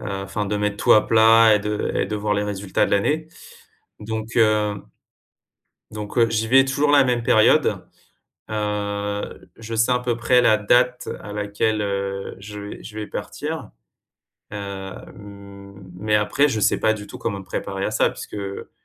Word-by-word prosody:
heu, - - -7
enfin 100 +1 -4
de 105 +1 -1
mettre 105 0 -1
tout - - +4
à 105 - +5
plat 115 0 +6
et - - +3
de 105 0 -2
et - - 0
de 105 - -3
voir 105 0 -1
les 105 - 0
résultats 100 -2 -1
de - - -6
l'année. 150 +11 +1 0.7
Donc 110 +1 -5
heu 105 -2 +3 1.2
donc 105 +2 -5
heu, 115 - +5
j'y 110 0 -1
vais 135 +2 +6
toujours 140 +2 +1
la 145 -1 +6
même 125 -2 0
période. 110 -1 +3 0.6
Heu, 105 -1 -3
je 115 0 -7
sais 115 +3 +3
à 125 - +1
peu 125 -1 -1
près 125 +1 +3
la 110 -2 +5
date 125 +4 +2
à 105 - -8
laquelle, 105 +1 -1
heu, 100 -1 -3
je 105 +1 -9
vais 100 0 -8
je 110 -1 -9
vais 105 - -4
partir, 150 -5 -6 0.8
heu, 105 - -5
hem, 100 0 -10
mais 105 +3 -1
après 125 +7 +2
je 110 -6 -2
sais - - +2
pas 110 - +2
du 105 -2 -7
tout - - -10
comment 100 -3 -3
me - - -12
préparer 95 +1 -4
à - - -2
ça - - +2
puisque, - - -10
heu, 100 -1 -6
105 Hz, 185 wpm, -22 LUFS, 100-115 Hz, 1.2 s, plat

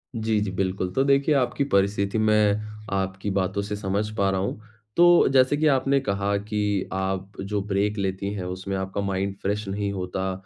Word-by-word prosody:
जी, 110 -1 0
जी 105 -2 -2
बिल्कुल। 95 -1 -1
तो 135 - +2
देखिए 140 +2 +3
आपकी 130 +1 +1
परिस्थिति 100 +1 +2
मैं 105 -1 +4 0.4
आपकी 95 +1 -2
बातों 95 +1 0
से 105 +1 -4
समझ 105 +1 -2
पा 100 -2 +2
रहा 95 -1 0
हूँ, 100 - -3 0.4
तो 175 0 +6
जैसे 130 +2 +4
कि 155 +1 +2
आपने 135 -1 +3
कहा 100 -4 -1
कि 105 -1 -1
आप 95 0 -2
जो 100 +1 -2
ब्रेक 105 +1 -1
लेती 100 0 -2
हैं, 95 -3 -4
उसमें 95 +2 -4
आपका 95 +1 -3
माइंड 100 0 -2
फ्रेश 105 +1 -2
नहीं 100 +1 -2
होता 95 0 -3
100 Hz, 185 wpm, -25 LUFS, 95-105 Hz, 0.4 s, तो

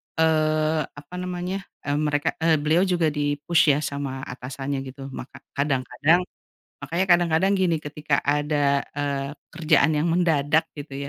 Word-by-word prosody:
eee, 155 -1 +2 0.2
apa 145 +4 -11
namanya, 180 +1 -3 0.2
mmm, 145 +1 -1
mereka 145 0 +1
eee, 160 0 +3
beliau 155 +5 +2
juga 170 -4 +1
di-push 145 +1 +2
ya - - 0
sama 140 -2 -4
atasannya 135 +2 -5
gitu. 135 +1 -9
Maka 135 +1 -9
kadang-kadang 145 +4 +1 0.6
makanya 170 +7 -1
kadang-kadang 175 +1 +3
gini 180 -4 +1
ketika 150 -1 -2
ada, 145 -1 +2 0.2
eee, 140 -1 -2 0.2
kerjaan 160 -2 +3
yang 155 +3 +1
mendadak 160 -2 +2
gitu 140 -1 -6
150 Hz, 135 wpm, -24 LUFS, 140-165 Hz, 0.6 s, eee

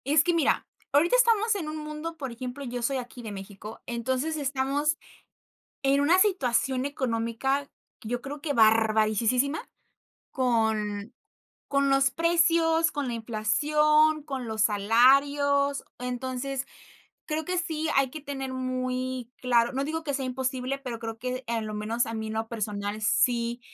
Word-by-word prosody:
Es 300 +2 +5
que 345 0 +2
mira, 325 -4 +1 0.3
ahorita 320 - +4
estamos 455 -3 +4
en 330 -6 -3
un 310 - -5
mundo, 305 +2 -6
por 270 -5 -5
ejemplo, 250 +3 -6
yo 245 0 -4
soy 265 +3 0
aquí 245 0 -7
de 220 -3 -7
México. 200 +2 -9
Entonces, 260 +6 -2
estamos 280 +2 0 0.9
en 275 +1 +3
una 335 +6 +4
situación 265 - +2
económica, 265 +1 -1 0.3
yo 240 +3 -3
creo 280 +2 -7
que 290 -2 -1
barbarisísisima, 225 +4 +3 0.7
con 220 -3 0 0.6
con 280 0 +2
los 270 0 +3
precios, 330 -1 +3
con 285 -3 -2
la - - -3
inflación, 300 +8 +2
con 270 -5 -5
los 220 -1 -2
salarios. 275 +7 +3 0.2
Entonces, 255 +2 -3 0.6
creo 310 0 -2
que 365 +2 -1
sí 320 -2 -1
hay 275 -1 +3
que 310 - -7
tener 270 -2 -5
muy 255 -1 -3
claro. 240 -1 +3
No 270 +1 -1
digo 320 +3 -3
que 285 - -1
sea 270 0 -2
imposible, 260 +1 -2
pero 250 -4 -5
creo 225 -1 -6
que, 255 +1 -4
en 225 -2 -2
lo 215 - -5
menos, 220 +3 -1
a 225 - -5
mí, 220 -1 -4
en 220 - -4
lo 220 +1 -2
personal, 210 -1 -3
sí 235 +1 +1
260 Hz, 155 wpm, -27 LUFS, 230-290 Hz, 0.9 s, Es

